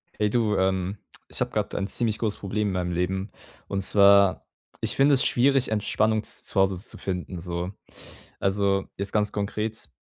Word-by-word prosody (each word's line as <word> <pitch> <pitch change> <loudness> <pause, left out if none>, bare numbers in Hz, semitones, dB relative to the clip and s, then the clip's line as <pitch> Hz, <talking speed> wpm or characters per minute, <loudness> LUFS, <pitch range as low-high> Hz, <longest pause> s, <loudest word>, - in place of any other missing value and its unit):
Hey, 105 0 +1
du, 110 -2 +1
ähm, 95 +1 0 0.3
ich - - -5
habe - - 0
gerade - - -2
ein 100 - -1
ziemlich 110 -1 -1
großes 110 -3 -2
Problem 105 +1 -1
in - - -2
meinem 90 -1 -1
Leben. 95 +3 -2 0.4
Und 100 -1 -2
zwar, 100 0 +5 0.4
ich - - -1
finde 140 +1 +5
es 130 - +4
schwierig, 135 +1 +3
Entspannung 110 0 +1
z - - -6
zu - - -1
Hause 95 -1 +2
zu 100 - -9
finden 90 -1 -4
so. 85 +1 -4 0.7
Also, 95 0 +1
jetzt 100 0 -2
ganz 105 -1 +1
konkret 105 -2 -3
100 Hz, 180 wpm, -25 LUFS, 95-110 Hz, 0.7 s, zwar